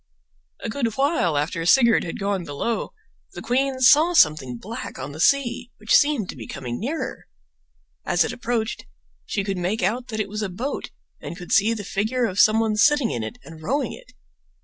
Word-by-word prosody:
A -, -, -2 dB
good 230 Hz, -1 st, -2 dB
while 270 Hz, -, +1 dB
after 165 Hz, +3 st, -1 dB
Sigurd 230 Hz, +6 st, +5 dB
had 165 Hz, -, -5 dB
gone 200 Hz, -2 st, -1 dB
below 170 Hz, +10 st, -3 dB, 0.4 s
the -, -, -7 dB
queen 265 Hz, +1 st, 0 dB
saw 305 Hz, +7 st, +6 dB
something 150 Hz, -, +3 dB
black 225 Hz, -, -7 dB
on 135 Hz, +2 st, -6 dB
the 150 Hz, -, -10 dB
sea 245 Hz, +2 st, +2 dB
which 215 Hz, +1 st, -1 dB
seemed 285 Hz, -9 st, +3 dB
to -, -, -5 dB
be 115 Hz, -5 st, -9 dB
coming 125 Hz, -3 st, -5 dB
nearer. 290 Hz, +8 st, -4 dB, 0.8 s
As -, -, +2 dB
it -, -, -3 dB
approached 235 Hz, -2 st, -3 dB, 0.4 s
she 200 Hz, -, -1 dB
could 195 Hz, -2 st, -3 dB
make 185 Hz, +4 st, -1 dB
out 240 Hz, +6 st, 0 dB
that 220 Hz, -3 st, -5 dB
it 215 Hz, -, -1 dB
was 210 Hz, +2 st, -5 dB
a 210 Hz, -, -2 dB
boat 235 Hz, +11 st, -4 dB, 0.3 s
and 170 Hz, -, -7 dB
could 180 Hz, -, -9 dB
see 210 Hz, +3 st, +4 dB
the 210 Hz, -, -6 dB
figure 215 Hz, +6 st, -1 dB
of 195 Hz, -2 st, -3 dB
some 215 Hz, +1 st, +6 dB
one 220 Hz, -1 st, 0 dB
sitting 290 Hz, 0 st, +4 dB
in 120 Hz, -, -3 dB
it 110 Hz, 0 st, -6 dB
and 160 Hz, -1 st, -12 dB
rowing 270 Hz, -, -1 dB
it. -, -, -14 dB
215 Hz, 195 wpm, -23 LUFS, 175-250 Hz, 0.8 s, saw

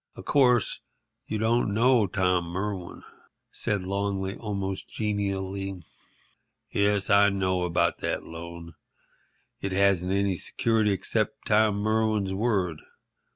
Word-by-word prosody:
"Of -, -, -10 dB
course, 125 Hz, -5 st, +3 dB, 0.5 s
you 110 Hz, -, -2 dB
don't 110 Hz, -1 st, +1 dB
know 120 Hz, -2 st, +4 dB
Tom 90 Hz, -1 st, +1 dB
Merwin," 95 Hz, +1 st, -5 dB, 0.5 s
said 100 Hz, -2 st, -1 dB
Longley, 100 Hz, 0 st, -2 dB
almost 100 Hz, -3 st, -4 dB
genially. 100 Hz, -2 st, -3 dB, 0.9 s
"Yes, 100 Hz, -1 st, +1 dB
I 100 Hz, 0 st, +6 dB
know 95 Hz, -2 st, 0 dB
about 85 Hz, -1 st, +1 dB
that -, -, -2 dB
loan. 85 Hz, 0 st, -9 dB, 0.9 s
It 95 Hz, -1 st, -3 dB
hasn't 95 Hz, -2 st, +2 dB
any 100 Hz, -1 st, +1 dB
security 110 Hz, +3 st, +1 dB
except 110 Hz, +3 st, -1 dB
Tom 105 Hz, -1 st, +3 dB
Merwin's 110 Hz, -1 st, 0 dB
word. 95 Hz, -7 st, 0 dB
100 Hz, 110 wpm, -27 LUFS, 95-105 Hz, 0.9 s, I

